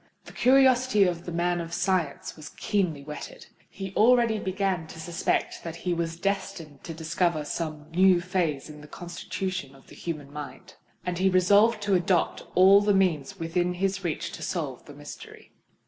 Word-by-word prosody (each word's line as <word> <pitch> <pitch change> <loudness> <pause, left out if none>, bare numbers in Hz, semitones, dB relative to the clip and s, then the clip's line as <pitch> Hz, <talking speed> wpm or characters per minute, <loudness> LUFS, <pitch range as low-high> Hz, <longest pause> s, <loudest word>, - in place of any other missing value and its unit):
The - - -12
curiosity 255 -4 +4
of 175 -2 -1
the - - -3
man 175 +1 0
of 165 0 -7
science 180 -7 -1
was 155 -2 -10
keenly 175 -9 -1
whetted: 155 - -8 0.2
he 195 -1 -7
already 235 -1 +4
began 190 -4 -1
to 160 - -11
suspect 170 +2 -1
that 165 -1 -6
he 175 +1 -2
was 165 -1 -3
destined 195 -6 -3
to 165 - -5
discover 160 -1 0
some 155 -1 -4
new 185 +1 +5
phase 175 -6 -1
in 150 -1 -11
the 150 - -12
constitution 175 -3 -5
of 135 - -19
the - - -13
human 150 -4 -6
mind; 150 -1 -9 0.3
and 180 -1 -2
he 190 +1 +4
resolved 205 +4 +4
to 205 -1 +1
adopt 180 -1 +1
all 195 +2 +7
the 205 -1 +3
means 185 -3 +1
within 175 +2 -1
his 195 +1 -1
reach 165 -3 -3
to - - -9
solve - - -4
the - - -12
mystery. - - -11
180 Hz, 175 wpm, -27 LUFS, 165-195 Hz, 0.3 s, all